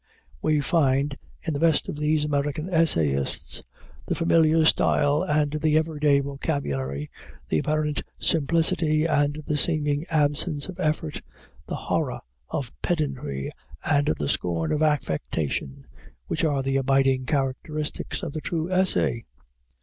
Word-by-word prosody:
We 155 -1 +2
find 140 -2 +2 0.3
in 160 - -2
the 140 - -2
best 160 -2 +3
of - - -4
these 150 0 +1
American 145 +2 -1
essayists 80 - +1 0.5
the - - 0
familiar 165 -1 +4
style 145 -1 +3
and 150 -1 +1
the 155 0 +2
everyday 150 -3 +2
vocabulary, 75 - -3 0.4
the 80 - +2
apparent 150 - 0 0.2
simplicity 160 0 +2
and 150 -1 +1
the 150 - 0
seeming 150 -1 +1
absence 150 0 0
of 185 -1 -8
effort, 155 -2 -1 0.5
the - - -3
horror - - -1 0.3
of 130 -4 -4
pedantry 135 - -2 0.3
and 145 0 +2
the 75 - -2
scorn 85 0 -1
of 150 - 0
affectation, 80 - -1 0.4
which - - -2
are 145 -4 +1
the 135 0 +1
abiding 135 -1 +2
characteristics 145 +2 -2
of - - -4
the 155 - -4
true 165 +2 -2
essay. 185 -10 +2
150 Hz, 130 wpm, -25 LUFS, 135-155 Hz, 0.5 s, familiar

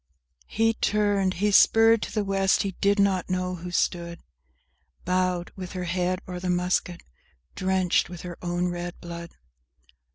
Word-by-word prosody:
VIII 60 0 -39
He 225 +1 +1
turned; 205 -3 +1
he 205 +3 +1
spurred 225 +2 +6
to - - -4
the 215 - -1
West; 195 -1 +2
he 195 - -2
did 200 +1 +3
not 195 -2 +1
know 185 0 -1
who 175 +1 -7
stood 170 -1 -1 0.9
Bowed, 180 -1 0
with 185 -2 -7
her 185 -1 -4
head 180 +1 -1
o'er 180 -1 -5
the 180 0 -3
musket, 180 0 -1 0.5
drenched 185 -2 +1
with 175 -1 -8
her 175 -1 -8
own 175 0 -1
red 175 0 -6
blood! 170 0 -8
180 Hz, 160 wpm, -26 LUFS, 175-195 Hz, 0.9 s, spurred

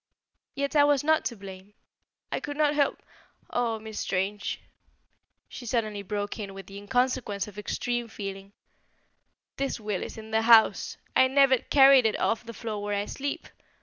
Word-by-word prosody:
Yet, 280 +2 -2
I 290 - +7
was 290 -2 +3
not 315 +1 +2
to 235 - -2
blame. 195 0 -11 0.6
I - - -1
could 290 0 -6
not 300 -1 +3
help 290 -1 0 0.5
Oh, 235 -2 0
Miss 220 0 -7
Strange," 195 +2 -2 0.9
she 245 - -9
suddenly 215 -3 -1
broke 205 +2 -4
in 195 -2 -6
with 195 - -9
the 195 - -10
inconsequence 240 -1 -1
of 210 0 -9
extreme 240 +3 -2
feeling, 195 -2 -7 1.0
"the 275 0 -2
will 210 -3 -3
is - - -7
in 220 0 -10
the 220 0 +2
house! 225 -1 +5 0.2
I 260 - +6
never 265 -1 +4
carried 270 -3 +6
it 215 - -2
off 225 - 0
the 230 - -8
floor 215 -1 -5
where 205 0 -2
I 200 - -1
sleep. 280 +5 -5
225 Hz, 170 wpm, -27 LUFS, 205-260 Hz, 1.0 s, I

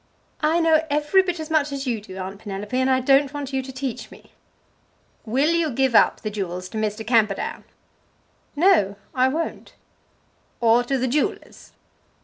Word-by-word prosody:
"I 315 +2 +2
know 320 -1 +3
every 295 +6 +3
bit 360 -2 -3
as 315 0 -6
much 300 -2 +2
as 275 0 -4
you 235 -4 -2
do, 190 -2 -11
Aunt 190 +1 -6
Penelope, 205 +2 -6
and 260 +1 +2
I 260 0 +3
don't 275 +1 +3
want 280 -2 -5
you 265 - 0
to 265 0 -9
teach 260 -2 -5
me." - - -17 0.9
"Will 270 +8 +1
you 335 -2 +1
give 265 -1 0
up - - +4
the 215 - -4
jewels 185 -3 -4
to 220 - -5
Mr. 215 +1 -3
Camperdown?" 215 -4 0 0.9
"No 300 - +3 0.2
I 255 0 +3
won't." 320 +5 -4 0.8
"Or 235 +1 +4
to 270 +2 0
the 260 0 -1
jewellers?" 285 +4 -3
260 Hz, 170 wpm, -23 LUFS, 220-295 Hz, 0.9 s, up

